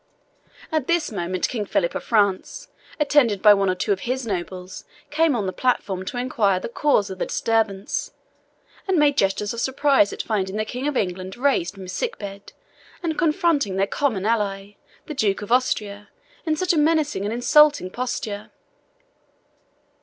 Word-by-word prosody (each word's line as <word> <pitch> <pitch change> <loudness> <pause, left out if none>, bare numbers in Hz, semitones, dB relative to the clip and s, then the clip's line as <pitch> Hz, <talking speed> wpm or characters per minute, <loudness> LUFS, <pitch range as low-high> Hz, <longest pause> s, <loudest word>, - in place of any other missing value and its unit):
At 310 -4 -1
this 340 -5 +1
moment 185 -2 -2
King 225 -4 -3
Philip 180 -3 0
of - - -4
France, 215 - 0 0.3
attended 280 -8 +3
by 210 0 +8
one 195 -1 +1
or 185 - +1
two 185 - -2
of 190 - -5
his 255 +4 -3
nobles, 185 -2 -5 0.3
came 310 -1 +2
on 210 -4 -1
the 185 - -3
platform 195 -7 -1
to 245 - -5
inquire 230 -7 +1
the - - -6
cause 230 -6 +1
of 190 - -8
the - - -1
disturbance, 220 -3 -1 0.8
and 380 -2 +2
made 295 -2 +4
gestures 200 -2 0
of 235 - -4
surprise 265 -5 +3
at - - -4
finding 195 -3 -2
the 215 0 -1
King 250 +5 -4
of 295 -3 -1
England 185 +1 -3
raised 245 -9 +1
from 195 - -9
his 185 - -7
sick 485 -1 -3
bed, 200 -1 -9 0.5
and 325 -2 -1
confronting 310 - +1
their 195 +1 +2
common 210 -3 -1
ally, 205 -3 -1 0.3
the 305 - -6
Duke 210 -6 0
of 205 - -8
Austria, 210 -5 0 0.4
in 310 - +2
such 365 +3 +1
a 320 - +2
menacing 300 -7 +1
and 205 - -2
insulting 290 -2 +4
posture. 225 -4 -4
215 Hz, 175 wpm, -23 LUFS, 195-285 Hz, 0.8 s, by